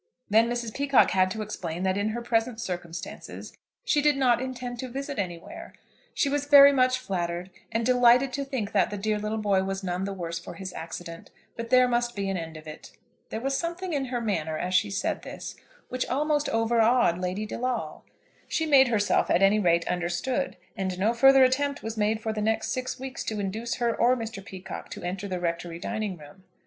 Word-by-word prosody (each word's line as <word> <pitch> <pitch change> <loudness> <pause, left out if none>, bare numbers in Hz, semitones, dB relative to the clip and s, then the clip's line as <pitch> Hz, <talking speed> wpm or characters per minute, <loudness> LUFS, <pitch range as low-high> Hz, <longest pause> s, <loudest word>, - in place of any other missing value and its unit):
Then 225 +2 +5
Mrs. 240 -2 -3
Peacocke 275 -2 +3
had 185 0 +3
to 215 +3 -4
explain 180 -4 -5
that 190 0 +1
in 205 +2 0
her 235 +2 -4
present 230 0 0
circumstances 175 -4 -6 0.3
she 295 - +3
did 295 -1 +3
not 250 -3 +3
intend 250 -2 -5
to 260 - -4
visit 275 0 -5
anywhere. 190 - -6 0.4
She - - +2
was 285 0 -1
very 280 -1 +9
much 255 -1 +3
flattered, 180 -6 -3 0.2
and 230 0 0
delighted 250 +1 +5
to 280 - -2
think 255 -6 -3
that 200 - +2
the 205 - -5
dear 210 +1 -1
little 210 +1 -2
boy 200 -3 +2
was 195 0 -3
none 180 +1 -2
the 200 - -3
worse 170 -2 -4
for 175 - -9
his 190 -2 -7
accident; 165 +1 -8 0.3
but 230 0 -6
there 255 0 +6
must 240 0 0
be 200 -1 -2
an - - -2
end 165 -2 -6
of 155 - -12
it. 155 0 -10 0.4
There 220 - -4
was 270 +2 0
something 345 +3 -3
in 275 -2 0
her 245 -1 -2
manner, 160 -9 -2
as 180 +3 -3
she 205 +3 +3
said 195 0 -2
this, - - -8 0.3
which 255 0 -2
almost 295 +2 0
overawed 225 -4 +3
Lady 185 +4 -2
De 215 - -6
Lawle. 250 0 -3 0.4
She 320 - 0
made 275 -4 +6
herself, 210 -4 +2
at 180 - +3
any 200 +2 +5
rate, 170 -3 +2
understood, 180 +10 -1 0.2
and 190 -3 -3
no 210 +5 +2
further 270 +2 +7
attempt 280 +2 +1
was 225 0 -4
made 215 +1 0
for 220 0 -2
the 215 - -3
next 220 +1 0
six 255 +2 -3
weeks 265 0 -5
to 215 -1 -3
induce 215 +4 -3
her 235 -2 0
or 250 +2 +3
Mr. 225 -4 -6
Peacocke 190 -2 -8
to - - -8
enter 190 +3 -4
the 185 -2 -3
Rectory 170 0 -3
dining 215 0 -3
room. 150 +5 -15
220 Hz, 210 wpm, -27 LUFS, 190-255 Hz, 0.4 s, very